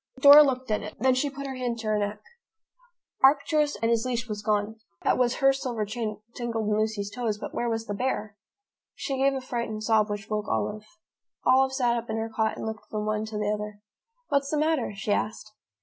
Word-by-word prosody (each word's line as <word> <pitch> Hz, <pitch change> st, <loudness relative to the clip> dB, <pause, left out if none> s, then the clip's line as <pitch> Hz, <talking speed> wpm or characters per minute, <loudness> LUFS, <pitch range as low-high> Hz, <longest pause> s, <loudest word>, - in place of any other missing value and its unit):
Dora 285 Hz, +2 st, +10 dB
looked 260 Hz, -4 st, +1 dB
at 210 Hz, -, +1 dB
it. -, -, -8 dB
Then 260 Hz, 0 st, +4 dB
she 260 Hz, +3 st, 0 dB
put 280 Hz, 0 st, -7 dB
her 270 Hz, -, -4 dB
hand 250 Hz, -2 st, -2 dB
to 225 Hz, -1 st, -6 dB
her 215 Hz, 0 st, +2 dB
neck. 205 Hz, +1 st, -3 dB, 1.0 s
Arcturus 290 Hz, +2 st, +4 dB
and 230 Hz, +2 st, +1 dB
his 230 Hz, -1 st, +2 dB
leash 245 Hz, -2 st, -2 dB
were 215 Hz, -, -3 dB
gone. 210 Hz, +1 st, 0 dB, 0.3 s
That -, -, +3 dB
was 245 Hz, -1 st, +2 dB
her 270 Hz, 0 st, +4 dB
silver 245 Hz, -5 st, -3 dB
chain 215 Hz, -1 st, -4 dB
tangled 230 Hz, -3 st, -3 dB
in 210 Hz, -, +2 dB
Lucy's 215 Hz, -2 st, -1 dB
toes, 230 Hz, -3 st, -2 dB
but -, -, -7 dB
where 240 Hz, -, -1 dB
was 225 Hz, 0 st, -2 dB
the 205 Hz, -, -4 dB
bear? 215 Hz, -2 st, -2 dB, 0.6 s
She 270 Hz, -2 st, -3 dB
gave 275 Hz, 0 st, +3 dB
a 265 Hz, -, -3 dB
frightened 235 Hz, -4 st, -4 dB
sob, 215 Hz, -1 st, +3 dB
which 205 Hz, +1 st, -4 dB
woke 210 Hz, -1 st, -2 dB
Olive. 110 Hz, -, -2 dB, 0.6 s
Olive 265 Hz, +1 st, +4 dB
sat 245 Hz, -3 st, +2 dB
up 235 Hz, 0 st, -5 dB
in 220 Hz, -, -1 dB
her 225 Hz, 0 st, -3 dB
cot 220 Hz, -1 st, 0 dB
and -, -, -5 dB
looked 220 Hz, -1 st, -6 dB
from 210 Hz, -1 st, -3 dB
one 215 Hz, 0 st, -1 dB
to 215 Hz, -1 st, -5 dB
the 210 Hz, 0 st, 0 dB
other. 210 Hz, 0 st, -6 dB, 0.5 s
"What's 280 Hz, -1 st, +1 dB
the 305 Hz, -, 0 dB
matter?" 305 Hz, -5 st, +1 dB
she 200 Hz, +1 st, -3 dB
asked. 215 Hz, +1 st, -2 dB
225 Hz, 220 wpm, -27 LUFS, 215-260 Hz, 1.0 s, Dora